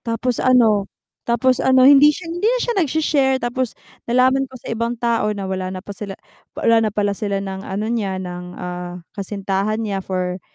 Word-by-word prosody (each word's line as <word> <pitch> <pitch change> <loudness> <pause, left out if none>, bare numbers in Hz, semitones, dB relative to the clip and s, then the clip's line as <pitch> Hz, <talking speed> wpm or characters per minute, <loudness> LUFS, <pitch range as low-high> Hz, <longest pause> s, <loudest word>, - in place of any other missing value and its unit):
Tapos 230 +1 -2
ano, 225 -6 +4 0.4
tapos 255 +2 +2
ano, 260 -1 +5
hindi 285 +1 +8
siya 300 +4 -1
hindi 355 +6 0
na - - +2
siya 475 - -1
nagshe-share 290 -3 +2
tapos 245 0 -2 0.3
nalaman 260 +2 +3
ko 260 - -11
sa - - -11
ibang 230 +1 -2
tao 230 -2 0
na 200 - -4
wala 190 -1 -3
na 185 +1 -7
pala 200 - -7
sila 200 -2 -5 0.4
wala 230 0 +3
na - - -5
pala 205 0 0
sila 200 0 -2
ng 190 0 -5
ano 200 +3 -2
niya, 200 -5 -1
ng, 180 -1 -6
ah, 180 0 -5 0.2
kasintahan 200 0 -2
niya 195 -2 -2
for 185 -1 -3
220 Hz, 190 wpm, -20 LUFS, 195-255 Hz, 0.4 s, hindi